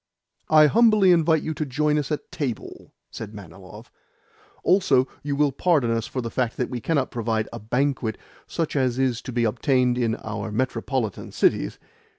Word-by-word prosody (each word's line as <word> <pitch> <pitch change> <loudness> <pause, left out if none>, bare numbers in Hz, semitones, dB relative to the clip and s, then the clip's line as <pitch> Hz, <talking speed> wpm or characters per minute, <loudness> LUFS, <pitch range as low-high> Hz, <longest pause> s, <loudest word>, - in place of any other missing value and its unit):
"I 155 -1 +7
humbly 215 +1 +5
invite 160 -2 +3
you 160 - -2
to 155 - -3
join 150 +2 +1
us 145 0 -4
at 150 - -4
table," 130 -7 -5 0.2
said 110 -1 -8
Manilov. 100 +3 -12 0.7
"Also, 155 -9 +3
you 145 -1 -2
will 145 0 +2
pardon 140 -4 +1
us 115 -1 -1
for 130 - -4
the 115 -1 -5
fact 125 -3 -1
that 125 - -2
we 125 -2 -4
cannot 145 -3 0
provide 110 -2 -1
a - - -6
banquet 125 0 -1 0.3
such 165 -3 -3
as 130 -3 +1
is 130 -3 0
to 130 - -7
be 120 -1 0
obtained 125 +2 +1
in 115 -2 +1
our 110 0 -5
metropolitan 125 -1 -2
cities? - - +1
130 Hz, 170 wpm, -24 LUFS, 115-150 Hz, 0.7 s, I